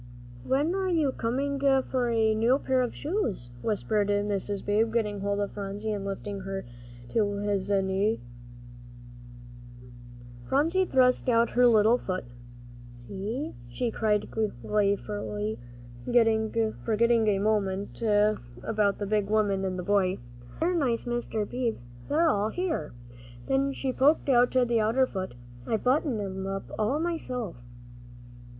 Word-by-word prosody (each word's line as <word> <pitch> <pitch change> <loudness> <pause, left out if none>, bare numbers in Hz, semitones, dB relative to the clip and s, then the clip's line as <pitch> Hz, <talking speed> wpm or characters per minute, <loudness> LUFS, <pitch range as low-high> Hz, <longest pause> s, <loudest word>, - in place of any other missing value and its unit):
"When 285 - +1
are 380 -1 0
you 315 -6 +2
coming 275 +4 -2
for 265 -2 +2
a 220 -1 +3
new 230 +4 +3
pair 260 -2 +1
of 245 - -2
shoes?" 285 - -2
whispered 210 -1 0
Mr. 205 -1 -1
Beebe, 215 +2 +2
getting 210 -3 -1
hold 200 +1 -1
of 205 - -2
Phronsie 205 +2 -4
and 205 -2 -3
lifting 200 0 -4
her 195 0 -5 0.5
to 210 -2 +2
his 200 -2 -1
knee. 195 +2 +1 2.3
Phronsie 330 +7 +2
thrust 255 -3 +3
out 230 -1 +3
her 245 +1 +5
little 225 +1 +5
foot. 185 -1 -3 0.7
"See," 195 - -5 0.2
she 230 - -2
cried 210 -2 0
gleefully, 205 - 0 1.1
forgetting 225 - +3 0.3
for 225 - 0
a 225 -2 +3
moment 200 -1 0
the 205 - 0
big 210 -1 0
woman 205 -3 +1
and 185 -1 -2
the 180 - -4
boy, 190 -1 +2 0.4
"dear, 345 +3 +1
nice 260 -9 0
Mr. 240 -3 -2
Beebe, 245 -3 -2 0.3
they're 325 +3 +3
all 210 -7 +2
here." 335 - -2 0.5
Then 275 +1 +1
she 265 -1 -3
poked 285 +3 +3
out 245 -1 +5
the 245 -3 +3
other 225 +5 +3
foot. 190 - -5 0.3
"I 220 - +1
buttoned 255 0 +1
'em 190 -1 -4
up 195 0 -5
all 230 +8 +1
myself." 255 - -3
220 Hz, 130 wpm, -28 LUFS, 200-255 Hz, 2.3 s, her